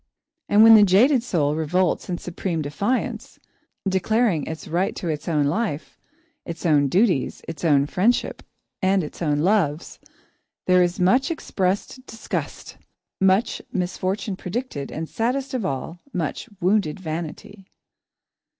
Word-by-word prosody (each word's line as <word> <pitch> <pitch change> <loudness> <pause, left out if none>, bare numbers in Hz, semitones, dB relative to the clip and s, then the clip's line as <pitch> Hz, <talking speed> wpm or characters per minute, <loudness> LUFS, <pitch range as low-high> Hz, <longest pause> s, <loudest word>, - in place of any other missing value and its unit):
And 210 +1 +6
when 225 0 +9
the 215 - +9
jaded 225 +8 +5
soul 155 -11 0
revolts 175 +5 0
in 175 - -2
supreme 170 -2 -3
defiance, 200 - -2 0.5
declaring 190 - +1
its 160 0 -6
right 180 +4 -1
to 175 - -4
its 150 -2 -4
own 150 -4 +1
life, 160 0 -2 0.4
its 170 +1 -7
own 145 -4 +4
duties, 180 - +1
its 165 -1 -7
own 145 -4 +4
friendships, 200 +11 0 0.4
and 190 -1 +2
its 150 - -9
own 150 -3 +1
loves, 175 -5 0 0.7
there 180 0 +4
is 175 +1 0
much 250 - +3
expressed 205 - -2
disgust, 225 - -6 0.4
much 190 +3 +2
misfortune 190 +2 -2
predicted, 185 - -5
and, 160 +1 -5
saddest 260 +7 -2
of 245 -6 -1
all, 140 +5 -5
much 180 - -4
wounded 185 -3 +1
vanity. 175 +4 -7
185 Hz, 130 wpm, -23 LUFS, 160-210 Hz, 0.7 s, when